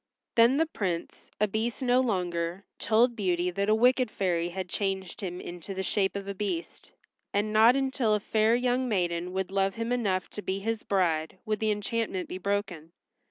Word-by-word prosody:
Then 235 +4 +6
the 325 - +3
Prince, 185 - -4
a 210 - +3
Beast 225 +5 -2
no 250 0 +4
longer, 180 -5 -2
told 235 +2 +3
Beauty 180 -4 0
that 200 +3 -1
a 215 - +5
wicked 250 +1 +3
fairy 175 -5 0
had 185 +1 -4
changed 190 -1 -3
him 180 -2 -4
into 175 +2 -7
the 190 - -2
shape 195 +1 +1
of 200 0 -5
a 200 - -3
Beast, 185 -4 -4 0.4
and 210 +1 +1
not 225 +3 +6
until 265 -5 +1
a - - 0
fair 220 +2 +2
young 250 +1 +1
maiden 175 -3 -1
would 190 0 -2
love 195 0 +1
him 230 +1 -3
enough 200 -7 0
to 210 - -6
be 190 -1 -2
his 225 +2 -2
bride 170 -4 0
would 215 -1 -1
the 220 - +1
enchantment 210 -2 -2
be 185 - -5
broken. 190 -5 -3
200 Hz, 190 wpm, -28 LUFS, 185-225 Hz, 0.4 s, Then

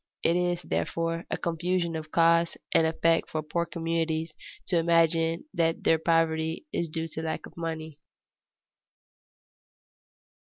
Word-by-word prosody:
It 165 - +3
is, 175 0 0
therefore, 165 0 -2
a - - -1
confusion 170 0 -1
of 155 -1 -5
cause 165 +1 +3
and 160 - +4
effect 165 +1 +2
for 155 -1 -2
poor 170 +3 -1
communities 165 -1 -2 0.3
to 175 -3 +2
imagine 165 - +2
that 165 -1 +1
their 160 - +4
poverty 160 - +1
is 170 - -1
due 160 +1 -3
to 160 - -5
lack 160 0 -3
of - - -14
money. 160 -2 -5
165 Hz, 130 wpm, -28 LUFS, 160-170 Hz, 0.3 s, and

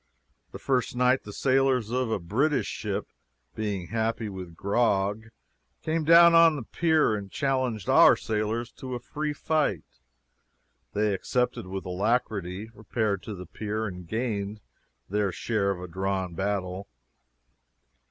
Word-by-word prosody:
The - - -7
first 125 -2 0
night 125 +1 +2
the 105 - -7
sailors 130 -1 +2
of 125 -1 0
a 110 - +1
British 125 - 0
ship, - - -4 0.4
being 100 -5 -3
happy 115 0 -1
with 90 -4 -8
grog, 100 +1 +1 0.6
came 160 0 0
down 170 +1 +8
on 165 -1 +7
the 140 - -5
pier 160 -1 +2
and 100 -2 -6
challenged 130 -7 -1
our - - +7
sailors 110 +2 -2
to 130 -1 -5
a - - -4
free 150 +5 -3
fight. 150 - 0 1.1
They 105 0 +1
accepted 125 +1 -1
with 95 +1 -5
alacrity, 100 0 -1
repaired 105 -6 -2
to 105 - -7
the 90 0 -8
pier, 110 +4 -4
and 90 -4 -7
gained 105 -1 -2 0.5
their 100 -1 0
share 105 0 -1
of 95 -2 -2
a 90 - -6
drawn 95 0 -2
battle. 95 0 -2
110 Hz, 140 wpm, -27 LUFS, 95-125 Hz, 1.1 s, down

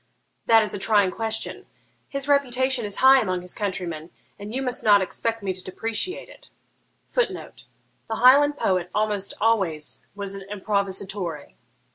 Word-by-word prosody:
'That 225 -1 +6
is 210 - -1
a - - -3
trying 205 -2 +3
question. 220 +1 -4 0.4
His 275 -1 -3
reputation 260 -3 +1
is 205 -1 -3
high 265 0 +8
among 185 -3 -2
his 180 - -5
countrymen, 175 -5 -4 0.3
and 205 +1 -7
you 265 +3 -2
must 250 -1 -3
not 205 -2 +6
expect 225 +3 -3
me 190 -1 -1
to 185 0 -10
depreciate 225 - -3
it. - - -17 0.6
[Footnote: - - -2 0.4
The 225 - -2
Highland 285 +5 +6
poet 180 -6 0
almost 210 -2 -1
always 190 -9 0
was 200 -1 -5
an 195 - -7
improvisatore. 195 -5 -3
210 Hz, 150 wpm, -24 LUFS, 190-240 Hz, 0.6 s, high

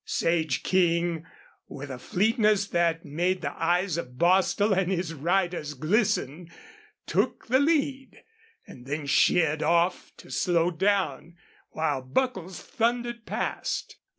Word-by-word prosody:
Sage 160 -5 0
King, 170 -3 +1 0.4
with 140 0 -8
a 125 - -7
fleetness 210 - +2
that 170 -1 0
made 175 +5 -1
the 140 - -3
eyes 175 +1 0
of 125 -5 -8
Bostil 190 +5 +3
and 190 -1 +1
his 175 -3 -2
riders 170 -1 -1
glisten, 175 - 0 0.6
took - - -1
the 260 +2 +4
lead, 280 -3 0 0.4
and 125 0 -13
then 145 +1 -3
sheered 155 +2 +3
off 170 +2 +1
to - - -14
slow 175 -1 +1
down, 170 -3 -1 0.3
while 150 -4 -1
Buckles 185 - -2
thundered 240 -1 -2
past. - - -3
175 Hz, 125 wpm, -26 LUFS, 155-200 Hz, 0.6 s, the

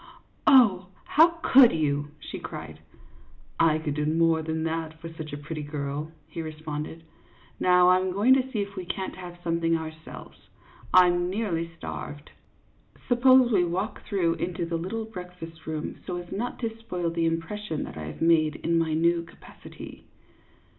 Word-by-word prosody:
" - - -37
Oh, 210 -9 +6 0.2
how 320 +3 +6 0.2
could 260 -3 +8
you? 145 -2 0
" 150 - -30
she - - -5
cried. - - -8 0.4
" - - -29
I 155 - +2
could 155 -2 -3
do 150 +1 -1
more 165 0 +3
than 160 0 -3
that 160 -1 -3
for 165 0 -7
such 155 -1 -7
a 145 - -5
pretty 150 +1 -6
girl," 145 +1 -4 0.2
he 165 - -6
responded. 155 0 -6 0.3
" - - -29
Now 180 0 +5
I 185 0 +6
'm 185 0 -1
going 210 +8 +4
to 265 0 +1
see 215 -5 0
if 200 0 -10
we 185 - -4
can't 190 +2 -4
have 180 -1 -9
something 165 -1 +1
ourselves. 160 0 -10 0.4
I 185 0 +8
'm 175 0 +1
nearly 185 -5 -2
starved. 145 -2 -7 0.8
Suppose 255 0 +5
we 190 -5 +4
walk 180 +5 -2
through 175 -6 0
into 175 -1 -2
the 170 0 -3
little 210 +7 -4
breakfast 180 -6 -10
room, 155 -1 -4
so 180 - -3
as 175 0 -8
not 240 +5 -3
to 225 -2 -2
spoil 180 -7 -3
the 165 0 0
impression 165 +1 -3
that - - -8
I 80 -1 -6
have 75 - -5
made 155 -2 +4
in 165 0 0
my 160 -1 0
new 170 +1 +2
capacity." 165 - -12
170 Hz, 180 wpm, -26 LUFS, 160-190 Hz, 0.8 s, could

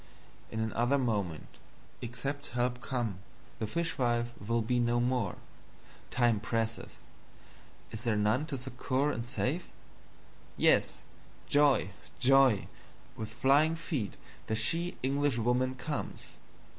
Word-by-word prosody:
In 110 - -4
another 120 +5 +1
Moment, 100 - -2 0.4
except 135 +5 -4
Help 125 0 0
come, 120 -8 -2 0.4
the 110 - -1
Fishwife 120 -5 0
will 115 +2 +1
be 120 +2 +1
no 120 0 +2
more. 120 -5 0 0.7
Time 120 -4 +2
presses 115 +2 -3 0.9
is 110 - -6
there 115 -2 +1
none 105 +8 +2
to 140 -4 -3
succor 130 +2 -1
and 115 - -3
save? 140 +7 -2 0.9
Yes! - - +3 0.4
Joy, 145 -9 +4 0.3
joy, 135 -5 +5 0.5
with 110 -1 -5
flying 140 +7 +4
Feet 150 - -3 0.3
the 110 - 0
she 165 +11 +1
Englishwoman 130 -2 +1
comes! 150 +4 -5
120 Hz, 110 wpm, -31 LUFS, 115-135 Hz, 0.9 s, joy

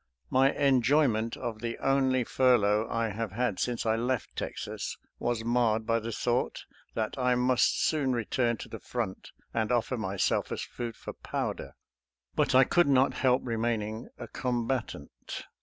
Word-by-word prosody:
My 135 +1 +5
enjoyment 130 -4 +2
of 115 -3 -5
the 115 -1 -3
only 135 -2 +2
fur 125 +1 +4
lough 105 +1 +1
I 115 -1 0
have 105 -1 -4
had 120 -3 -1
since 120 -2 -1
I 110 0 +3
left 125 +2 -2
Texas - - -4 0.2
was 120 -2 -1
marred 115 -2 +2
by 115 0 +2
the 115 +1 -5
thought 120 +2 -1 0.3
that 110 +4 -2
I 125 -1 +3
must 125 0 +3
soon 145 -4 +1
return 120 0 0
to - - -8
the 110 - -8
front 110 -5 -4 0.2
and 110 0 0
offer 120 +1 +1
myself 100 -3 0
as - - -3
food 120 -2 -6
for - - -8
powder, - - -4 0.6
but - - +2
I 130 - +8
could 175 +5 +3
not 135 -1 +4
help 130 0 +2
remaining 115 -1 -2
a - - -7
combatant. 120 - -3
120 Hz, 160 wpm, -29 LUFS, 110-130 Hz, 0.6 s, I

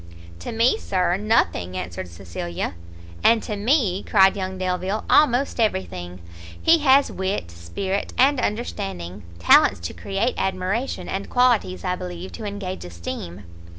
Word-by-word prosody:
"To - - -6
me, 235 - +2
Sir, 180 -2 0
nothing!" 195 - 0
answered 90 0 -5
Cecilia. 85 0 -5 0.5
"And 230 -1 +4
to 210 - -4
me," 205 - +1
cried 195 -1 +4
young 190 -1 -4
Delvile, 185 +3 -2
"almost 275 -3 +3
every 210 -4 +2
thing! 90 0 -9 0.4
he 330 0 +5
has 280 -1 +4
wit, 190 - -3
spirit, 85 - -4
and 270 +1 +4
understanding, 95 - -3 0.2
talents 85 - +5
to 85 - -5
create 200 +5 -1
admiration, 190 +7 -2
and 195 +1 -4
qualities, 245 -7 +2
I 180 -1 0
believe, 180 0 -7
to 225 - -8
engage 200 -2 -5
esteem!" 85 +2 -7
190 Hz, 140 wpm, -23 LUFS, -, 0.5 s, he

